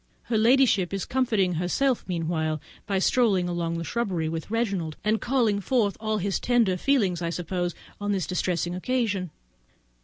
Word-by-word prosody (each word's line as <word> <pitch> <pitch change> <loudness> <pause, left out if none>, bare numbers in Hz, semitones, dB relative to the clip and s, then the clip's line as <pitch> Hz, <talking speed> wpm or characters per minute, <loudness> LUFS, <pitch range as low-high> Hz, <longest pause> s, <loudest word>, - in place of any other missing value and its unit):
Her 230 - 0
ladyship 225 -6 +4
is 195 - -3
comforting 220 -8 +1
herself 200 - 0
meanwhile 160 -3 -1 0.3
by 195 - 0
strolling 195 -3 +2
along 170 -1 -2
the 165 - -3
shrubbery 185 -6 -1
with 160 +2 -4
Reginald, 200 -9 -1 0.2
calling 235 -5 +1
forth 215 -2 +1
all 215 0 -1
his 200 -1 -1
tender 235 -6 +2
feelings, 195 -6 +1
I 170 - -1
suppose, 175 +1 -2 0.2
on 205 0 -1
this 190 -4 0
distressing 175 -1 -1
occasion. 200 -2 -1
195 Hz, 150 wpm, -26 LUFS, 175-230 Hz, 0.3 s, ladyship